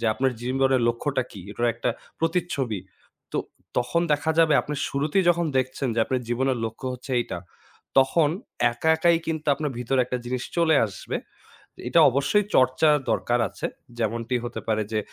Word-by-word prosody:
যে - - -4
আপনার 130 +4 +1
জীবনের 130 +1 +2
লক্ষ্যটা 130 +3 0
কি, 100 - -9
এটার 120 +3 -1
একটা 120 +1 -1 0.3
প্রতিচ্ছবি। 165 - -1 0.5
তো - - 0 0.4
তখন 125 +7 +1
দেখা 150 +2 +1
যাবে 160 -2 +5
আপনি 150 - -4
শুরুতেই 150 +7 +1
যখন 170 -1 +1
দেখছেন 130 +1 -1
যে, - - -2
আপনার 130 +1 -1
জীবনের 130 +1 0
লক্ষ্য 115 +3 -5
হচ্ছে 125 +2 -11
এইটা, 120 - -4 0.6
তখন 145 +4 +4 0.4
একা 120 +7 -2
একাই 170 +1 +4
কিন্তু 160 -1 -3
আপনার 150 0 -3
ভিতরে 125 +2 +1
একটা 125 +1 -3
জিনিস 125 0 -3
চলে 165 -2 +4
আসবে। 95 -5 -5 0.7
এটা - - +5
অবশ্যই 140 - +2
চর্চার 130 +4 +4 0.2
দরকার 120 0 +1
আছে। - - -6 0.3
যেমনটি 115 +2 -1
হতে 120 - -5
পারে 110 -1 +1
যে, 110 - +1
130 Hz, 165 wpm, -25 LUFS, 120-155 Hz, 0.7 s, যাবে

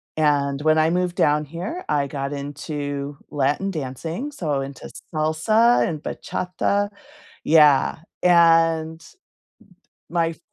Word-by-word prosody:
and 145 -2 +1
when 155 +1 +3
I 155 +1 +3
moved 180 0 0
down 150 -1 +2
here, 175 - -6
I 145 -2 +1
got 140 0 -4
into 145 0 -5
Latin 145 +7 0
dancing, 160 - -5
so 150 - -2
into 135 0 -8 0.2
salsa 160 +10 +3
and 155 -3 -4
bachata 200 +3 -2 0.5
Yeah, 150 -2 +4 0.2
and 165 -2 +4
d 165 - -17 1.0
my 170 -1 +1
f 165 - -10
155 Hz, 120 wpm, -22 LUFS, 145-170 Hz, 1.0 s, Yeah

